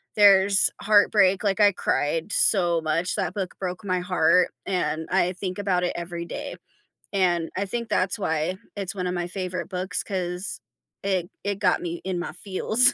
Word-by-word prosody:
there's 200 -1 +6
heartbreak, 205 -2 +4
like, 200 0 0
I 205 -1 +6
cried 165 +1 -1
so 175 -5 +3
much, 165 +3 -1
that - - -2
book 190 -3 -3
broke 185 +2 -5
my 185 -1 0
heart, 180 0 +3 0.2
and 160 -4 -1
I 185 -1 +2
think 185 +1 -5
about 185 -3 0
it 175 - 0
every 170 0 -5
day. - - -6 0.6
And 175 -4 +1
I 200 +2 -1
think 235 +3 -4
that's 185 +3 0
why 160 0 -1 0.2
it's 200 0 -3
one 180 -1 -2
a - - -1
my 175 -1 -2
favorite 185 0 -4
books 180 -1 -2
'cause 180 -1 -3 0.4
it 185 -3 -1 0.2
it 200 -1 -2
got 185 -3 +2
me 170 -1 -5
in 185 -2 -2
my 175 - -4
feels, 215 +7 +4
185 Hz, 175 wpm, -25 LUFS, 175-200 Hz, 0.6 s, there's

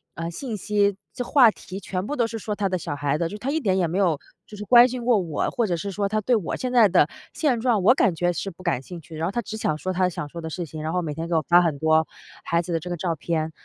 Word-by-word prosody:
呃， 165 0 -4
信 235 +4 -5
息， 205 0 +1 0.2
这 250 - -3
话 250 -7 +6
题 190 -1 -9
全 185 +1 -3
部 295 - -2
都 235 - +2
是 225 -1 -6
说 210 0 -3
她 200 -2 -1
的 185 - 0
小 145 -3 -4
孩 145 +1 0
子， 170 - 0
就 210 - -7
她 255 +6 -4
一 320 - 0
点 190 -8 +1
也 180 - +2
没 175 +4 -2
有 175 -7 +2 0.3
就 210 - -11
是 210 - -7
关 240 +3 +7
心 250 -1 -5
过 240 -3 +4
我， 165 -5 -2
或 235 -3 0
者 175 - 0
是 200 +4 -4
说 200 +1 -1
她 215 +1 -1
对 245 - +1
我 185 - -3
现 255 -1 -3
在 235 -4 +6
的 - - +4 0.3
现 265 -7 +1
状， 225 -6 +1
我 245 - +7
感 185 -10 +2
觉 175 +2 +1
是 195 +3 -4
不 185 +1 -14
感 170 -8 0
兴 170 +3 -9
趣。 160 +1 -11
然 165 +2 -1
后 - - -2
她 240 - -1
只 220 0 -7
想 155 -7 -1
说 185 +4 -3
她 185 0 +2
想 150 -4 -5
说 170 - -8
的 160 -1 -5
事 175 +2 -4
情， 155 0 -8
然 160 +2 -2
后 180 - +1
每 150 -3 -4
天 165 +2 -5
给 170 - -1
我 160 - +3
发 175 +1 +6
很 160 -5 0
多 160 -1 +3 0.4
孩 170 0 +1
子 175 - -7
的 165 - +1
这 180 - -8
个 175 - -2
照 170 0 -1
片。 160 +1 -2
185 Hz, 340 characters per minute, -24 LUFS, 165-215 Hz, 0.4 s, 关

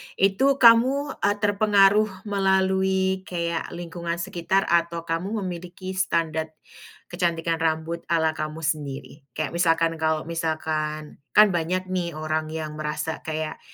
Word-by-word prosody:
itu 195 +7 +2
kamu, 255 +5 +5
eee, 205 +1 +3
terpengaruh 205 -1 +3
melalui 190 -1 +1
kayak 170 -2 -2
lingkungan 170 0 -4
sekitar 175 +3 0
atau 170 -1 +1
kamu 190 +6 -2
memiliki 180 +1 -6
standard, 165 -4 0 0.6
kecantikan 170 -2 -1
rambut 160 +1 -1
ala 160 -1 +2
kamu 155 +1 -4
sendiri? 145 -1 -4
Kayak 155 - -2
misalkan 165 -1 +2
kalau 160 -1 0
misalkan, 155 -2 -3 0.2
kan 210 +1 +8
banyak 180 +2 -1
nih 175 -3 -2
orang 155 0 -2
yang 155 -1 -5
merasa 155 +1 -3
kayak, 155 -1 -4
170 Hz, 120 wpm, -24 LUFS, 160-190 Hz, 0.6 s, kan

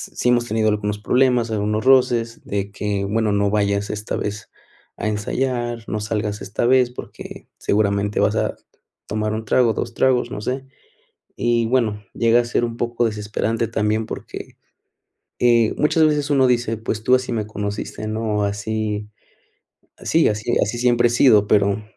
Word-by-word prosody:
sí 125 - +1
hemos 120 -1 +3
tenido 110 -1 +1
algunos 105 -1 -1
problemas, 125 +1 +2
algunos 105 +1 -1
roces, 125 -3 +3
de 100 0 -3
que: 100 -1 -2
"Bueno, 110 +1 0
no 100 0 +2
vayas 100 -1 0
esta 105 0 -4
vez 105 0 -5 0.5
a - - -2
ensayar, 120 +2 -2
no 110 - -2
salgas 105 0 -3
esta 105 - -2
vez, 130 -1 +4
porque, 125 - -10
seguramente, 100 0 0
vas - - +2
a - - 0 0.5
tomar 110 0 -2
1, 110 0 -4
trago, 115 +1 +3
2, 115 +1 -4
tragos", 125 -1 +1
no 105 - -5
sé, 130 +4 -3 0.7
y 120 -1 +1
bueno, 110 -4 0
llega 115 +1 +3
a - - -6
ser 120 0 0
un 115 -1 -5
poco 120 0 0
desesperante 110 +1 -2
también, 110 0 0
porque, - - -8 1.2
muchas 160 +1 +3
veces, 150 -1 0
eh, - - +3
uno 135 -2 +4
dice: 120 -2 +1
"Pues, 110 -1 -4
tú 125 - +4
así 130 -1 -4
me 110 -3 -2
conociste" 105 0 -5
¿no? 110 -1 -1
Así 105 +1 -3 0.9
así 165 0 +2
así 105 0 -1
así 110 +3 -3
siempre 120 -1 +3
he - - -1
sido, 115 -4 +5
pero, 100 0 +2
110 Hz, 165 wpm, -21 LUFS, 105-120 Hz, 1.2 s, sido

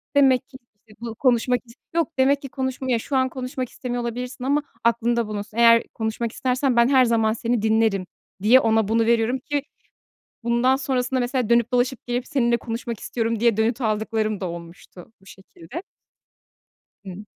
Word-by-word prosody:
demek 265 -2 +4
ki, 270 - -12 0.2
işte, 215 +1 -23
bu, 230 -1 -6
konuşmak 250 0 +2
is 230 - -16 0.2
yok, 335 -3 +1
demek 275 +2 +3
ki 275 - -7
konuşmaya 260 -2 -2
"Şu 275 - -4
an 260 0 +2
konuşmak 255 -1 -5
istemiyor 245 -1 -4
olabilirsin 250 +2 -5
ama 285 +3 +1 0.2
aklında 235 0 +1
bulunsun: 210 +1 -6
Eğer 230 0 +6
konuşmak 225 +1 -3
istersen 255 +1 0
ben 235 0 +5
her 260 -1 +5
zaman 225 -2 +2
seni 235 0 -1
dinlerim." 220 -3 +2 0.4
diye 230 +6 +6
ona 225 -3 +2
bunu 225 +1 +2
veririm 235 +2 +2
ki 290 +3 -2 0.8
bundan 235 +3 +2
sonrasında 260 -1 -1
mesela 245 -1 -1
dönüp 235 0 +3
dolaşıp, 250 +1 0
gelip, 245 +1 -2
“Seninle 240 -5 +1
konuşmak 230 -1 -5
istiyorum.” 230 -1 -2
diye 230 -2 +3
dönüt 225 +3 0
aldıklarım 215 -1 -1
da 190 - -3
olmuştu 170 +2 -11
bu - - -22
şekilde 190 - -10 1.2
Hı. 190 +2 -8
235 Hz, 165 wpm, -23 LUFS, 220-255 Hz, 1.2 s, Eğer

